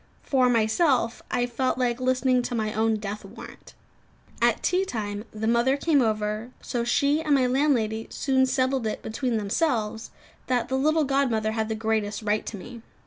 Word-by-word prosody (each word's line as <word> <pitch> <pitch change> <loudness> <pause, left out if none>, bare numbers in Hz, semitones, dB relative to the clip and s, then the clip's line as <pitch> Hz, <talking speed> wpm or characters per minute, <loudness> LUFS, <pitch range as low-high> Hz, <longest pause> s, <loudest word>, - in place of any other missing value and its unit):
For 255 -2 +2
myself, 235 +2 +2
I 245 -1 +1
felt 255 +2 -1
like 250 -1 0
listening 255 0 +2
to 245 0 -4
my 215 -1 -1
own 220 0 +1
death 210 0 -5
warrant. - - -12 0.7
At - - +2
tea 365 +1 +2
time 210 - -4
the 215 0 -4
mother 235 +4 +2
came 290 -2 +2
over; 215 0 -1
so 240 -1 -3
she 280 +5 +2
and 300 -2 +2
my 260 -2 +3
landlady 250 -5 +1
soon 260 -1 +1
settled 260 -2 0
it 215 - -4
between 230 +1 -2
themselves, 220 0 -1 0.4
that 250 -2 0
the 260 - 0
little 310 +4 +2
godmother 255 -6 +1
had 220 0 -2
the 220 - -1
greatest 220 -1 -1
right 210 0 0
to 210 - -5
me. 235 +5 -10
240 Hz, 175 wpm, -25 LUFS, 220-265 Hz, 0.7 s, my